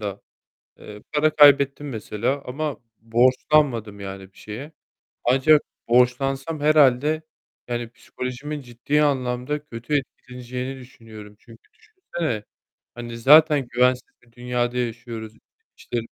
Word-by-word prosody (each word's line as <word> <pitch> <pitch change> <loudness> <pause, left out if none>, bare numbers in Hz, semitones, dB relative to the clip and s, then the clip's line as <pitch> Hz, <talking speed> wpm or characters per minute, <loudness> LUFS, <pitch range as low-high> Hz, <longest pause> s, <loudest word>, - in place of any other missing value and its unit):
da. 100 -1 -5 0.6
Iıı, 105 0 -12
para 155 +1 +3
kaybettim 145 -1 +5
mesela 120 +3 -3
ama 145 +3 -4 0.2
borçlanmadım 120 -1 +1
yani 95 -1 -8
bir - - -22
şeye. 125 +9 -8 0.5
Ancak 135 +5 +4 0.3
borçlansam 135 +5 +1
herhâlde, 150 0 +3 0.5
yani, 120 -1 -3
psikolojimin 130 +5 -6
ciddi 125 +4 -1
anlamda 135 +1 -1
kötü 120 +1 -5
etkileneceğini 125 0 -7
düşünüyorum, 110 -4 -13
çünkü 115 -1 -19
düşünsene, 175 - -5 0.5
hani, 120 -1 -7
zaten 150 +1 +6
güvensiz 125 +1 +2
bir 120 -1 -26
dünyada 120 0 -2
yaşıyoruz, 115 -2 -5 0.4
işte 120 - -5
125 Hz, 110 wpm, -23 LUFS, 115-145 Hz, 0.6 s, zaten